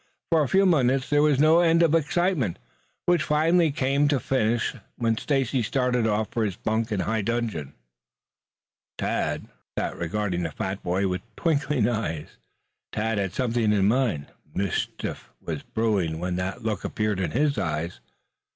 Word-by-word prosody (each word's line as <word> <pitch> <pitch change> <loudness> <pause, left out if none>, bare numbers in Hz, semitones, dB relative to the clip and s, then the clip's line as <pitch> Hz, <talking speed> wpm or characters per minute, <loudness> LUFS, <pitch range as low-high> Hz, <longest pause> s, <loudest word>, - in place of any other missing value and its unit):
For 165 -2 +5
a 145 - +1
few 195 +1 +4
moments 135 -6 +2
there 145 0 +5
was 150 -2 +4
no 155 +3 +6
end 170 -1 +4
of 165 -2 +3
excitement, 165 - +1 0.5
which 175 -1 +3
finally 165 +2 +3
came 140 0 +2
to 145 - +3
a - - 0
finish 120 -3 0 0.2
when 115 -2 +1
Stacy 135 0 0
started 125 0 +1
off 105 0 0
for 115 - 0
his 100 -4 -1
bunk 110 +1 -1
in 100 -3 0
high 110 0 0
dudgeon. 105 - -2 1.2
Tad - - -1 0.3
sat - - -1
regarding 90 +1 -2
the 85 - -1
fat 95 +4 -3
boy 95 +3 0
with 90 -1 -2
twinkling 150 -7 +1
eyes. 105 -10 -3 0.5
Tad 110 0 -1
had 95 -3 -2
something 120 -4 +1
in 100 -2 +3
mind. 110 - +1 0.3
Mischief 95 -9 -3
was - - -5
brewing 100 -8 0
when 90 +1 -2
that 95 +6 -3
look 105 -4 -2
appeared 105 -2 -1
in 95 - 0
his 145 +3 +1
eyes. 80 +1 -2
115 Hz, 160 wpm, -25 LUFS, 100-145 Hz, 1.2 s, no